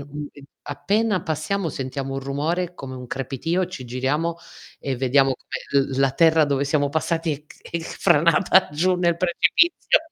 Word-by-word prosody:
uhm, 145 0 -6 0.4
appena 210 -3 0
passiamo 165 +4 -2
sentiamo 135 0 -4
un 135 - -3
rumore, 160 +6 -2
come 130 -5 -8
un 125 -1 -8
crepitio, 135 +9 -2
ci 150 -8 -8
giriamo 140 +7 -1 0.4
e 135 -2 -3
vediamo 135 +1 +3
come 135 +2 -2
l 135 -1 -4
la 135 -1 +3
terra 160 +1 +4
dove 140 -1 0
siamo 145 0 +1
passati 165 +1 -1
è 150 +1 -8
c - - -17
è 170 - -4
c - - -7
franata 170 +3 +3
giù 180 +5 +2
nel 170 -2 +1
precipizio. 185 - +3
150 Hz, 165 wpm, -23 LUFS, 135-170 Hz, 0.4 s, terra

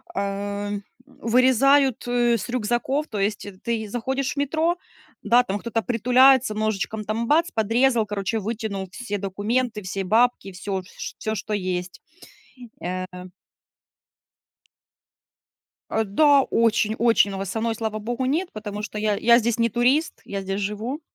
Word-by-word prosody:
э, 200 +1 -3 0.3
вырезают 260 +1 +3
с 240 -4 +1
рюкзаков. 250 +5 -1
То 210 -3 -5
есть, 205 +2 -1
э, 205 - -7
ты 225 -2 -2
заходишь 265 +4 -2
в - - -23
метро, 320 +5 +1 0.5
да, 245 +1 +5
там 205 -2 -3
кто-то 230 -1 -2
притуляется, 250 +1 +4
ножичком 215 0 -2
там 225 +2 -2
бац, 325 +3 +3
подрезал, 230 +1 +2
короче, 210 +1 -2
вытянул 210 -2 -4
все 205 -3 -4
документы, 210 +4 -1
все 195 +1 -3
бабки, 225 0 +2
всё, 190 +1 -4
ш - - -8
всё, 220 0 -2
что 210 +2 -4
есть, 180 -2 -3 0.8
э 185 +1 -3 2.9
Э, 220 - +1
да, 280 +7 +5
очень-очень, 225 -1 +2
но 195 - -5
вот 195 0 -4
со 220 +4 -3
мной, 225 0 -1
слава 220 -1 -3
богу, 240 +4 -3
нет, 330 +7 0
потому 210 -1 -6
что 215 0 -6
я 210 -1 +1
я 235 +1 +5
здесь 235 0 -1
не 230 0 +3
турист, 255 +8 +1
я 195 -1 -4
здесь 195 +1 -3
живу. 220 +9 -3
225 Hz, 145 wpm, -24 LUFS, 205-245 Hz, 2.9 s, да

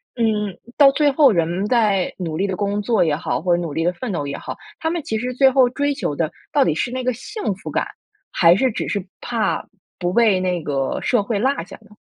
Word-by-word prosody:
嗯， 210 -5 0 0.2
到 280 -2 +7
最 290 0 +2
后 275 -3 +5
人 165 -4 +1
们 185 +4 -2
在 210 -6 +1
努 165 -4 -4
力 200 +2 0
地 190 - -2
工 205 +1 -1
作 225 -1 +2
也 150 - +1
好， 155 - -2
或 175 0 +2
者 175 - -2
努 165 -3 -4
力 165 +3 -1
地 175 +1 +1
奋 235 +3 -5
斗 150 -5 -2
也 140 0 -4
好， - - -7 0.2
他 320 - -1
们 335 -1 -2
其 220 -6 -2
实 250 +2 -3
最 265 0 +5
后 255 -2 +4
追 285 +3 0
求 150 - -3
的 155 0 -1 0.2
到 - - +3
底 165 - +2
是 160 - -1
那 255 0 -3
个 255 0 +1
幸 415 - -4
福 190 - -9
感， - - -1 0.5
还 170 0 +5
是 260 +2 +2
只 - - -4
是 200 -3 -2 0.2
怕 230 -3 -1 0.4
不 175 0 -1
被 215 -3 +4
那 180 -2 -1
个 135 -2 -1
社 245 -5 +2
会 205 +1 -2
落 260 +6 +2
下 - - -12
呢？ 215 - -22
205 Hz, 270 characters per minute, -21 LUFS, 175-250 Hz, 0.5 s, 到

